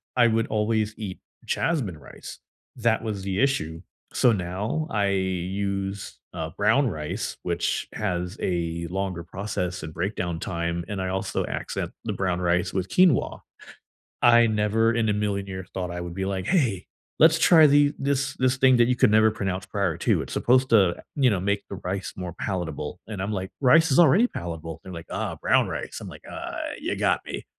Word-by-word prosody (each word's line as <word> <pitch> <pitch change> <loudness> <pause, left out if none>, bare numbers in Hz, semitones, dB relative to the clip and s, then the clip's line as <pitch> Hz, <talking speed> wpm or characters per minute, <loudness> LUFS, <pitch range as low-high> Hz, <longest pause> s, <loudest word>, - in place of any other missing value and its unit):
I 120 -2 +5
would 115 0 +1
always 110 0 0
eat 100 -4 -6 0.3
Jasmine 120 - -1
rice. 70 - -11 0.4
That 115 -2 +1
was 105 -3 -3
the 95 0 -2
issue, 85 - 0 0.3
so 125 - +4
now, 105 - -2
I 100 -2 +1
use, 95 +1 -2
uh, 80 -2 -4
brown 110 +7 +2
rice, 75 -7 -4
which - - -1
has 90 -2 -3
a 85 -1 -2
longer 95 -2 -3
process 90 -1 -4
and 80 0 -7
breakdown 90 -2 -2
time, 85 -4 -3
and 100 -2 -4
I 95 - -2
also 95 +1 -2
accent - - -4
the - - -1
brown 90 -2 -1
rice 90 +1 +1
with 95 0 -2
quinoa. 180 -7 +3 0.8
I 120 -1 +6
never 110 +2 +2
in 115 -1 +1
a - - +2
million 100 -1 -1
years 95 -1 -7
thought 90 -2 -3
I 90 0 -4
would 85 -1 -6
be 95 +1 -3
like, 95 -1 -3
"Hey, 125 - +1 0.3
let's 160 +1 +6
try 160 -2 +7
the 145 0 +4
this 135 0 0
this 130 0 +1
thing 130 -1 +5
that 120 -1 +5
you 125 - +2
could 125 -3 +4
never 110 0 +5
pronounce 95 -3 -3
prior 100 +1 -1
to, - - +2
it's - - -7
supposed 130 +2 +3
to, 95 -6 +4 0.2
you 135 -4 +4
know, 100 - +1
make 100 +2 -1
the - - -5
rice 95 +1 -3
more 90 -2 -5
palatable." 90 -3 -4
And 105 -4 -5
I'm 100 +3 -2
like, 95 -2 -4
"Rice 160 +5 +5
is 135 - +4
already 175 - +6
palatable." 80 - -6
They're 95 - -9
like, 85 -1 -8
"Oh, - - -3
brown - - +3
rice." - - -5
I'm - - -7
like, - - -12
"Ah, - - -6 0.2
ya - - -2
got - - +1
me." - - -6
100 Hz, 190 wpm, -25 LUFS, 90-115 Hz, 0.8 s, try